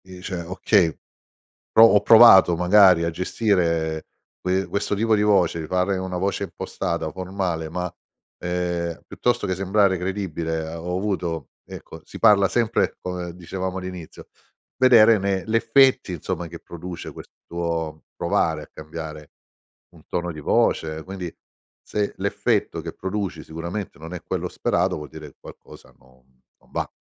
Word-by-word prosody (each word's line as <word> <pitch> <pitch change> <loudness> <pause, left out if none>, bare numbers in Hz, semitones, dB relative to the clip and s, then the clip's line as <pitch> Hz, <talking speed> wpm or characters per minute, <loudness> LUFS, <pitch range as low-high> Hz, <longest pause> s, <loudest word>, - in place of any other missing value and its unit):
Dice: 90 -1 -6
"Okay, 90 0 +1 0.8
pro 115 - +9
ho 105 -2 +4
provato 100 -6 +8
magari 90 -1 +5
a 85 - 0
gestire 85 -4 0 0.4
que 95 +1 0
questo 100 0 -2
tipo 110 +2 +2
di 105 - +1
voce, 90 -6 +2
fare 90 +3 0
una 95 -1 -4
voce 95 +2 -1
impostata - - -4
formale, 90 -4 -3
ma, 90 +1 -3 0.5
ehm, 85 -1 -2
piuttosto 120 - -1
che 95 - -1
sembrare 95 +1 +2
credibile, 90 -3 -3
ehm, 85 - -6
ho 90 +2 -3
avuto" 90 -5 -3 0.2
ecco - - -11
si - - -10
parla 100 -2 +5
sempre, 115 +1 0
come 90 -2 -5
dicevamo 95 +1 -5
all'inizio 90 -3 -9 0.5
vedere 115 -4 +6
ne 95 -2 -1
l'effetti, 115 0 +3
insomma, 85 +1 -4
che 85 +1 -9
produce 85 0 -8
questo 85 -2 -5
provare 80 -2 0
a - - -11
cambiare 75 -1 -8 0.6
un - - -17
tono 85 0 -3
di 75 - -9
voce. 80 +1 +1
Quindi, 95 -1 -7 0.5
se 105 -1 -2
l'effetto 100 -3 -1
che 80 0 -6
produci 95 -4 -4
sicuramente 85 +5 -6
non 80 +3 -9
è 90 - -7
quello - - -3
sperato, - - 0
vuol 75 -1 -7
dire - - -10
che - - -20
qualcosa - - -14
non 65 0 -27 0.2
non - - -27
va. - - -3
90 Hz, 145 wpm, -23 LUFS, 85-100 Hz, 0.8 s, pro